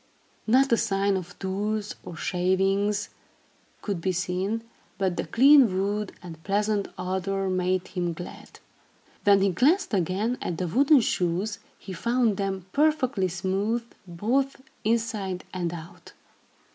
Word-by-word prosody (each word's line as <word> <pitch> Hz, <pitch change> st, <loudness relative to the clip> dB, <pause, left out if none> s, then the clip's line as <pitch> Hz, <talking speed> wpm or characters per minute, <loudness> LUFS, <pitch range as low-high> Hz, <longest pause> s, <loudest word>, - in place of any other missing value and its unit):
Not 260 Hz, +4 st, +4 dB
a 230 Hz, -, +5 dB
sign 195 Hz, -1 st, +1 dB
of 180 Hz, -1 st, -6 dB
tools, 205 Hz, +2 st, -2 dB
or 170 Hz, -, -8 dB
shavings 195 Hz, +4 st, 0 dB, 0.7 s
could 200 Hz, -5 st, -3 dB
be 185 Hz, -, +1 dB
seen, 185 Hz, +5 st, -2 dB, 0.3 s
but 190 Hz, -2 st, 0 dB
the -, -, -3 dB
clean 260 Hz, -5 st, +6 dB
wood 205 Hz, +1 st, -1 dB
and 165 Hz, -3 st, -9 dB
pleasant 205 Hz, 0 st, 0 dB
odor 190 Hz, +1 st, -2 dB
made 185 Hz, 0 st, 0 dB
him 175 Hz, -2 st, -2 dB
glad. 175 Hz, +2 st, -10 dB, 0.7 s
When 200 Hz, -1 st, +6 dB
he 195 Hz, -, +3 dB
glanced 280 Hz, -, +2 dB
again 200 Hz, +6 st, 0 dB
at 170 Hz, -, -3 dB
the 180 Hz, -, -2 dB
wooden 275 Hz, -, +5 dB
shoes, 185 Hz, +1 st, -1 dB, 0.2 s
he 190 Hz, -, -9 dB
found 235 Hz, +1 st, +1 dB
them 195 Hz, -2 st, -2 dB
perfectly 280 Hz, -9 st, +2 dB
smooth, 195 Hz, +6 st, -1 dB, 0.2 s
both 250 Hz, +11 st, 0 dB, 0.2 s
inside 215 Hz, -5 st, -1 dB
and 175 Hz, -2 st, -2 dB
out. 165 Hz, -1 st, -10 dB
195 Hz, 135 wpm, -26 LUFS, 185-220 Hz, 0.7 s, clean